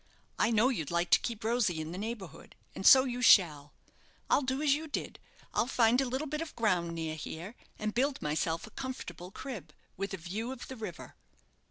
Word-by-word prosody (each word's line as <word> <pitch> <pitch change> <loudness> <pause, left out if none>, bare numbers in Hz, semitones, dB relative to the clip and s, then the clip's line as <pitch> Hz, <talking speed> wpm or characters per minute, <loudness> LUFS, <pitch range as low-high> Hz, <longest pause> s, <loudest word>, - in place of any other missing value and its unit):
I - - +4
know 230 +2 +4
you'd 165 - -2
like 170 0 0
to - - +7
keep 230 -2 -5
Rosy 220 -7 +1
in 155 +1 -5
the 180 - -6
neighbourhood, 210 -6 -7 0.2
and 190 - 0
so 260 -1 +10
you 250 -2 -3
shall. 150 -11 +5 0.6
I'll - - +5
do 260 0 -1
as 290 -2 +5
you 310 +2 -2
did. 290 - -4 0.3
I'll 230 - +1
find 245 0 +3
a - - 0
little 260 +5 -2
bit 305 +1 -3
of 330 - -6
ground 180 -7 +1
near 160 -1 -3
here, 160 +6 -7 0.2
and 215 0 -2
build 270 +3 +1
myself 160 +2 -1
a 220 - -14
comfortable 180 - -6
crib, 195 - -8 0.2
with 195 +1 -3
a - - -9
view 205 +8 -4
of 260 -2 -8
the 260 - -6
river." 220 -3 -7
220 Hz, 205 wpm, -31 LUFS, 170-260 Hz, 0.6 s, so